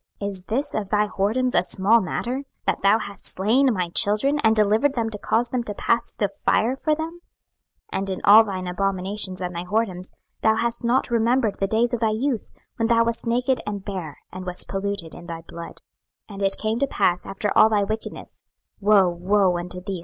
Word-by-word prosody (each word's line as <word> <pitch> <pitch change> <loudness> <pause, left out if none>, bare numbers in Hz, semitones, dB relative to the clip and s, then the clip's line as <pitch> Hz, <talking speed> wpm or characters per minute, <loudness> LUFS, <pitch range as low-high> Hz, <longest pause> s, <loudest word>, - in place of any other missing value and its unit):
Is 200 -2 -5
this 275 +8 -2
of 205 -3 -3
thy 210 0 +1
whoredoms 235 +7 0
a - - +3
small 205 +5 +3
matter, 240 +6 -3
26:016:021 275 - -7 0.2
That - - 0
thou 200 +2 +5
hast 200 -2 -7
slain 245 +8 +3
my 180 -5 -1
children, 215 +11 +2
and 220 -4 +3
delivered 220 +7 +2
them 225 -2 -1
to 210 - -6
cause 235 +4 0
them 250 -1 -1
to 205 - -5
pass 235 +3 +1
through 210 - -1
the 200 - -20
fire 240 +4 +2
for 305 +3 0
them? 325 +2 -6 0.7
26:016:022 - - 0
And 195 0 -4
in 190 - -4
all 215 +3 +8
thine 190 -4 -5
abominations 190 +1 -2
and 180 -1 -4
thy 170 - -3
whoredoms 190 -2 -2 0.3
thou 220 0 +3
hast 235 +1 -1
not 240 +1 +1
remembered 230 -1 +1
the 195 - +1
days 230 +4 +1
of 240 - 0
thy 225 -1 +2
youth, 230 +2 -2 0.3
when 225 - +1
thou 230 0 +4
wast 230 +1 -1
naked 250 +2 +1
and 205 -2 -4
bare, 180 -7 -5
and 185 0 -8
wast 180 0 -3
polluted 195 -4 -4
in 175 - -11
thy 165 -1 -6
blood. 170 0 -9 0.5
26:016:023 - - -8
And 200 - -8
it 195 0 +4
came 220 +2 -1
to 280 - +2
pass 180 -8 0
after 195 +1 -2
all 220 - +7
thy 210 -2 +2
wickedness, 220 +2 -6 0.4
(woe, 200 -2 +5
woe 180 +2 +1
unto 180 +1 -5
thee! 190 -1 -5
210 Hz, 215 wpm, -23 LUFS, 190-235 Hz, 0.7 s, all